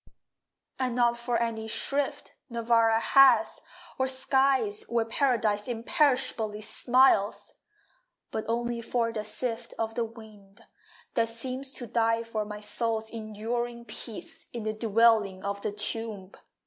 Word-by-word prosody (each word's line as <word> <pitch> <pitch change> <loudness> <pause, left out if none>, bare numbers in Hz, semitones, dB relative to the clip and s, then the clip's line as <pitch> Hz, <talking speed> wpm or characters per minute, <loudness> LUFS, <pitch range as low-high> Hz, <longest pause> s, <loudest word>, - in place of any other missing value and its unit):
And 255 -2 -1
not 240 -1 +3
for 235 0 -1
any 225 -1 -2
shrift 280 +5 0 0.2
Nirvana 230 -1 +3
has, 275 +3 +5 0.4
or 260 - +2
skies 260 -4 +2
Where 235 -1 +1
Paradise 225 -4 +1
imperishably 240 -4 0
smiles. 220 -1 +3 0.8
But 220 - -3
only 235 +1 -1
for 230 0 -1
the 215 -2 -3
sift 230 +1 -4
Of 225 0 -2
the 235 0 -1
wind, 215 -3 -15 0.5
that 230 -1 +1
seems 260 +4 -4
to 245 - -4
die 230 0 +1
for 220 -2 -3
My 210 0 -7
soul's 220 +1 -2
enduring 235 +2 -4
peace 230 -2 -8
In 235 -2 -5
the 215 0 -1
dwelling 215 -3 +3
of 200 0 -3
the - - -2
Tomb. 210 -2 -3
230 Hz, 130 wpm, -28 LUFS, 215-240 Hz, 0.8 s, has